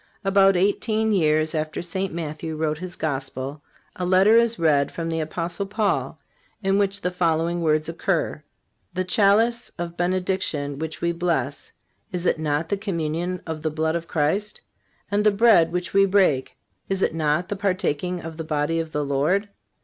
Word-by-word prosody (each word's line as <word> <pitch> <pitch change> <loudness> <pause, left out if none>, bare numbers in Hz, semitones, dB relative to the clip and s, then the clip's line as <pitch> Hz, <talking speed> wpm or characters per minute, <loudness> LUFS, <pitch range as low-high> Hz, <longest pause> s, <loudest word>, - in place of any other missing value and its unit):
About 195 -1 +5
eighteen 215 +3 +1
years 155 -4 +2
after 155 +1 -2
St. 190 +2 -3
Matthew 160 -1 -5
wrote 155 0 -1
his 185 0 -7
Gospel, 135 -1 -4 0.3
a 180 - -4
letter 190 +4 +5
is 235 0 +3
read 145 -4 +2
from 165 -1 -4
the 165 0 -1
Apostle 170 +5 -3
Paul, 205 0 -1 0.4
in 195 +1 +2
which 200 0 +1
the 180 - -1
following 170 -1 0
words 155 -1 +1
occur: 170 -2 -1 0.5
"The 185 - 0
chalice 215 +5 +3
of 170 0 -5
benediction 175 -6 -1
which 160 0 -5
we 170 - +1
bless, 165 -6 -2 0.4
is 180 -1 -3
it 160 - +2
not 155 +1 -1
the 200 - 0
communion 175 -2 -3
of 160 -2 -5
the 155 - 0
blood 160 +1 -1
of 165 0 -3
Christ? 180 +8 -1 0.5
and 205 +1 +2
the 210 - +6
bread 205 -5 +5
which 180 0 -3
we 195 0 +5
break, 185 -9 +2 0.3
is 195 0 0
it - - +1
not 155 +2 0
the 205 - -2
partaking 180 -3 -1
of 160 -1 -8
the 160 - -4
body 155 +1 0
of 160 -1 -4
the 150 0 -1
Lord?... 155 +10 +1
170 Hz, 170 wpm, -24 LUFS, 155-195 Hz, 0.5 s, the